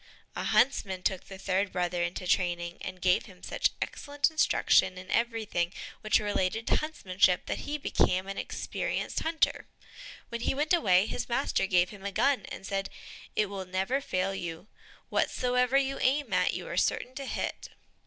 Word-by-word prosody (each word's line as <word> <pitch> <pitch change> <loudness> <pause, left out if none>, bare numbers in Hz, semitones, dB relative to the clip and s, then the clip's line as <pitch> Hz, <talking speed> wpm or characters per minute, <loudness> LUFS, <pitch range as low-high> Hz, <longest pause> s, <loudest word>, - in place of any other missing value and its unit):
A - - -3
huntsman 190 -8 +2
took 190 -1 0
the 195 - -9
third 195 +1 0
brother 175 -1 -1
into 175 +1 -2
training, 175 -1 0
and 185 0 -6
gave 180 -1 +3
him 185 -2 -16
such - - +1
excellent 290 +2 -1
instruction 190 - +3
in 185 +1 -9
everything 220 -7 0 0.3
which 215 0 +4
related 205 +1 -1
to - - +3
huntsmanship, 190 - +1
that - - -4
he 300 - -1
became 185 -9 +1
an 195 0 -5
experienced - - -3
hunter. 320 0 0 0.6
When 235 0 -4
he 265 - 0
went 300 +4 +1
away, 190 - +5
his - - -4
master 240 -5 +1
gave 180 -1 +3
him 200 -2 -11
a 200 - -3
gun 275 +7 +2
and - - -8
said, 195 0 -2 0.5
"It 210 - +3
will 195 -1 -5
never 190 +9 0
fail 185 -6 -1
you; 170 -2 -5 0.4
whatsoever 250 +1 +2
you 275 0 0
aim 285 +3 +1
at, - - +2
you - - -5
are - - -5
certain 255 - +1
to 275 +1 -6
hit." - - -3
195 Hz, 175 wpm, -29 LUFS, 185-255 Hz, 0.6 s, away